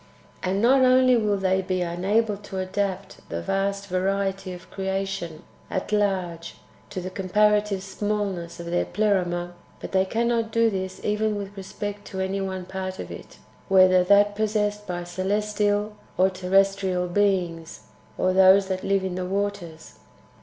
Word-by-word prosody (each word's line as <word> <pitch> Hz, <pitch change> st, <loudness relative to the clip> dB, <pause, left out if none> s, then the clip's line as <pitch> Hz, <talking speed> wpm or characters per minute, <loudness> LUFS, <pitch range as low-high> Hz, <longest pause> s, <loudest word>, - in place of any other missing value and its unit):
And 195 Hz, +3 st, -1 dB
not 260 Hz, +3 st, +5 dB
only 255 Hz, 0 st, +5 dB
will 210 Hz, -3 st, +1 dB
they 190 Hz, 0 st, +1 dB
be 185 Hz, -1 st, -2 dB
unable 200 Hz, +6 st, 0 dB
to 200 Hz, -1 st, -8 dB
adapt 190 Hz, 0 st, -3 dB
the 85 Hz, -, -3 dB
[vast] 195 Hz, -, -1 dB
variety 195 Hz, 0 st, -1 dB
of 180 Hz, 0 st, -11 dB
creation 190 Hz, -4 st, -3 dB, 0.3 s
at 190 Hz, -, -3 dB
large 190 Hz, -5 st, -1 dB, 0.3 s
to 190 Hz, -, -5 dB
the 185 Hz, +1 st, -6 dB
[comparative] 205 Hz, +1 st, +2 dB
smallness 195 Hz, -4 st, -3 dB
of 170 Hz, -, -6 dB
their 175 Hz, +1 st, 0 dB
Pleroma, 175 Hz, -4 st, 0 dB, 0.3 s
but -, -, -7 dB
they 190 Hz, 0 st, +3 dB
cannot 230 Hz, +2 st, 0 dB
do 230 Hz, 0 st, +3 dB
this 190 Hz, -1 st, -4 dB
even 210 Hz, 0 st, +1 dB
with 200 Hz, 0 st, -6 dB
respect 205 Hz, +1 st, -6 dB
to 190 Hz, -, -6 dB
any 190 Hz, +1 st, -1 dB
one 190 Hz, -1 st, -4 dB
part 185 Hz, 0 st, -5 dB
of -, -, -7 dB
it, -, -, -10 dB, 0.3 s
whether 185 Hz, -1 st, +6 dB
[that 205 Hz, +2 st, +4 dB
possessed 210 Hz, -1 st, -1 dB
by] 175 Hz, -1 st, -3 dB
celestial 205 Hz, +3 st, -1 dB, 0.2 s
or 190 Hz, +1 st, +4 dB
terrestrial 190 Hz, 0 st, +1 dB
beings, 175 Hz, -4 st, 0 dB, 0.4 s
or 185 Hz, -, +2 dB
those 190 Hz, +1 st, +6 dB
that 185 Hz, 0 st, -2 dB
live 195 Hz, -1 st, +1 dB
in 190 Hz, -1 st, -2 dB
the 180 Hz, 0 st, -3 dB
waters. 195 Hz, -4 st, -4 dB
195 Hz, 155 wpm, -25 LUFS, 185-205 Hz, 0.4 s, whether